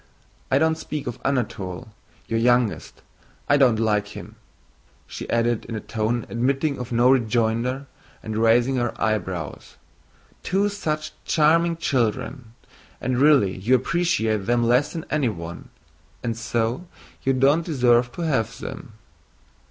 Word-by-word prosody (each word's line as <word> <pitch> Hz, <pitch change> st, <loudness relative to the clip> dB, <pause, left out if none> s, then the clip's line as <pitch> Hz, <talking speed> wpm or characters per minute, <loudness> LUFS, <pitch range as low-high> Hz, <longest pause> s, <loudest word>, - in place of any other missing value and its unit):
I 135 Hz, -, +3 dB
don't 160 Hz, +2 st, +2 dB
speak 150 Hz, -2 st, -5 dB
of 120 Hz, 0 st, -5 dB
Anatole, 110 Hz, -8 st, -2 dB, 0.4 s
your 115 Hz, -, 0 dB
youngest. 120 Hz, -1 st, +1 dB, 0.4 s
I 145 Hz, -, +4 dB
don't 130 Hz, -6 st, +4 dB
like 105 Hz, -2 st, 0 dB
him," -, -, -10 dB, 0.7 s
she -, -, -8 dB
added 115 Hz, -1 st, +1 dB
in 115 Hz, -, -6 dB
a -, -, -2 dB
tone 115 Hz, +2 st, -2 dB
admitting 135 Hz, +4 st, 0 dB
of 125 Hz, 0 st, -6 dB
no 120 Hz, +2 st, +4 dB
rejoinder 120 Hz, +2 st, +1 dB, 0.4 s
and 110 Hz, -1 st, -5 dB
raising 120 Hz, +4 st, +3 dB
her 120 Hz, -1 st, -2 dB
eyebrows. 95 Hz, -7 st, -3 dB, 0.7 s
"Two 195 Hz, +2 st, +1 dB
such 155 Hz, -7 st, -3 dB
charming 165 Hz, +2 st, +3 dB
children. 120 Hz, -3 st, -2 dB, 0.4 s
And 130 Hz, -1 st, -1 dB
really 140 Hz, -10 st, +4 dB
you 110 Hz, +8 st, +2 dB
appreciate 115 Hz, -, 0 dB
them 120 Hz, 0 st, +2 dB
less 125 Hz, +4 st, +2 dB
than 165 Hz, -2 st, -5 dB
anyone, 100 Hz, -, -3 dB, 0.5 s
and 115 Hz, -2 st, -2 dB
so 115 Hz, +6 st, -2 dB, 0.3 s
you 135 Hz, -, +1 dB
don't 140 Hz, +5 st, +3 dB
deserve 125 Hz, -6 st, +2 dB
to -, -, -6 dB
have 125 Hz, -7 st, 0 dB
them." 110 Hz, -, -8 dB
120 Hz, 135 wpm, -23 LUFS, 110-140 Hz, 0.7 s, I